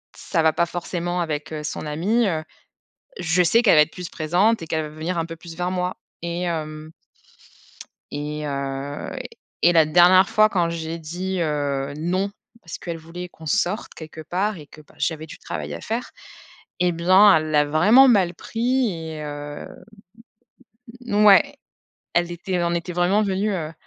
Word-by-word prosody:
ça 165 -4 -1
va 160 -1 +4
pas 170 - +2
forcément 175 +1 -3
avec, 155 -1 -3
heu, 150 -1 -5
son 150 - -5
ami, 200 +10 +1
heu, 160 -3 -1 0.8
je 180 +1 +2
sais 230 +8 +4
qu'elle 205 - +6
va 150 - +8
être 150 - +1
plus 180 -2 -7
présente 180 +7 +1
et - - -8
qu'elle 160 0 -1
va 150 - -6
venir 160 +3 -4
un 165 - -1
peu 165 0 -8
plus 165 0 -11
vers 180 +1 -2
moi 180 0 -2 0.3
et 170 +1 -3
hem 155 -2 -4 1.2
et 150 +1 -4
heu, 140 0 -4 0.5
et 175 - +6
la 160 -1 +6
dernière 180 +4 +6
fois, 215 0 +5
quand 175 -5 0
j'ai 165 0 -4
dit, 180 +3 -4
heu, 145 -2 -1
«non», 185 +5 -1 0.3
parce 165 - -8
qu'elle 170 -2 -5
voulait 170 +3 -8
qu'on 160 - -15
sorte 180 +7 -1
quelque 160 0 -9
part 190 +5 -1
et 150 - -11
que, 155 - -15
bah, 150 - -20
j'avais 160 -1 -2
du - - -10
travail - - -6
à - - -7
faire, 230 +3 -3 0.7
et 180 0 +3
bien, 185 +3 +6
elle 155 0 -1
l'a 150 0 +4
vraiment 205 - +6
mal 185 -7 +3
pris, 240 +3 0 0.2
et 155 -1 -6
heu, 145 0 -7 1.4
ouais, 210 +7 +5 0.6
elle 175 0 +1
était 175 +2 -7
elle 175 -1 +1
en 170 0 0
était 170 +1 -4
vraiment 185 +5 +2
venue, 200 +2 0
heu, 160 -3 -4
170 Hz, 180 wpm, -23 LUFS, 155-185 Hz, 1.4 s, va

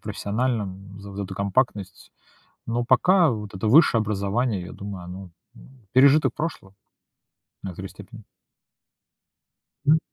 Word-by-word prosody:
профессиональном. 100 -3 -3
За 100 0 -10
за 100 - -3
эту 95 - -7
компактность. 100 -1 -2 0.5
Но 120 +1 -1
пока 170 +7 +4
вот 105 -3 -5
это 95 +3 -2
высшее 125 -2 +6
образование, 105 0 -1
я 90 - -9
думаю, 100 -3 -7
оно, 90 +1 -9 0.2
ну, 120 - -16 0.2
пережиток 140 +4 +5
прошлого. 145 -11 -5 0.9
В - - -7
некоторой 95 +1 -7
степени. 110 +2 -13 1.6
М. 155 +2 +6
105 Hz, 125 wpm, -24 LUFS, 95-125 Hz, 1.6 s, высшее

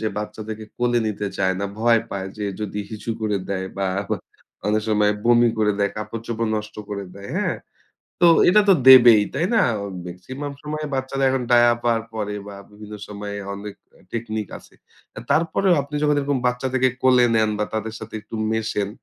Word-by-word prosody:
যে 110 - -2
বাচ্চাদেরকে 110 +1 -6
কোলে 120 0 +2
নিতে 105 -1 -3
চায় 95 -1 +2
না। - - -1
ভয় 115 0 +4
পায় 95 -1 -4
যে 105 - -3 0.2
যদি 105 0 -4
হিসু 110 +1 -5
করে 105 -2 0
দেয় 95 -1 -2
বা 95 - 0 0.8
অনেক 105 0 +1
সময় 105 -1 +3
বমি 120 0 +5
করে 105 -1 +3
দেয়, 100 0 +1
কাপড়-চোপড় 115 +1 -4
নষ্ট 105 0 -6
করে 100 -1 -4
দেয়। 100 0 -9
হ্যাঁ? - - -1 0.6
তো 175 - +6 0.2
এটা 210 +4 +6
তো - - +8
দেবেই। 120 -5 +9
তাই 165 +5 +1
না? 225 - +5 0.5
মেক্সিমাম 130 +12 -7
সময় 155 +1 -4
বাচ্চারা 135 +1 -1
এখন 130 -1 0
ডায়াপার 120 -1 +4
পরে 105 -1 -3
বা 100 - -8 0.2
বিভিন্ন 105 0 -11
সময়ে 100 0 -6 0.2
অনেক 100 0 -8 0.4
টেকনিক 110 -3 -3
আছে। - - -21 0.6
তারপরেও 165 +5 +3
আপনি 140 +2 -11
যখন 150 -1 +3
এরকম 140 -1 0
বাচ্চাদেরকে 130 +1 +1
কোলে 125 -1 +5
নেন 110 -1 +3
বা 105 - +1
তাদের 110 0 -3
সাথে 110 - -10
একটু 110 - -12 0.2
মেশেন 105 -2 -1
110 Hz, 170 wpm, -22 LUFS, 105-130 Hz, 0.8 s, দেবেই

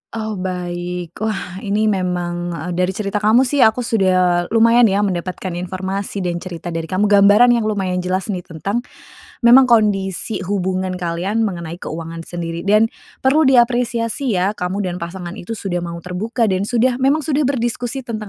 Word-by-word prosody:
Oh, 220 -3 -4
baik. 180 -1 -5
Wah 195 -4 -3
ini 205 +2 -1
memang 175 -4 -1
eee, 165 +4 -5
dari 180 +2 -1
cerita 205 0 -2
kamu 220 +5 +4
sih 280 +2 0
aku 225 0 +4
sudah 185 -5 +2
lumayan 230 +1 +6
ya 200 +1 +1
mendapatkan 185 0 -3
informasi 190 +2 -4
dan 175 -1 -2
cerita 175 -1 -7
dari 165 -1 -4
kamu, 205 +4 0
gambaran 205 +4 +6
yang 230 -3 +1
lumayan 190 -4 -1
jelas 185 +3 -2
nih 185 - -2
tentang 180 +6 -3 0.6
memang 250 +2 +7
kondisi 205 -4 +1
hubungan 185 -1 -1
kalian 175 +5 -1
mengenai 170 -1 -7
keuangan 165 +1 -6
sendiri. 170 -1 -4
Dan 215 +4 +3 0.3
perlu 285 +2 +4
diapresiasi 240 -1 +2
ya 185 +3 +1
kamu 195 0 -3
dan 180 -1 -4
pasangan 175 +1 -6
itu 220 +3 -7
sudah 180 -3 -3
mau 170 -1 -5
terbuka 220 +7 -2
dan 195 -1 0
sudah 245 +1 +1
memang 280 +3 +2
sudah 295 -1 0
berdiskusi 245 0 -2
tentang 215 -3 -5
195 Hz, 165 wpm, -19 LUFS, 180-225 Hz, 0.6 s, memang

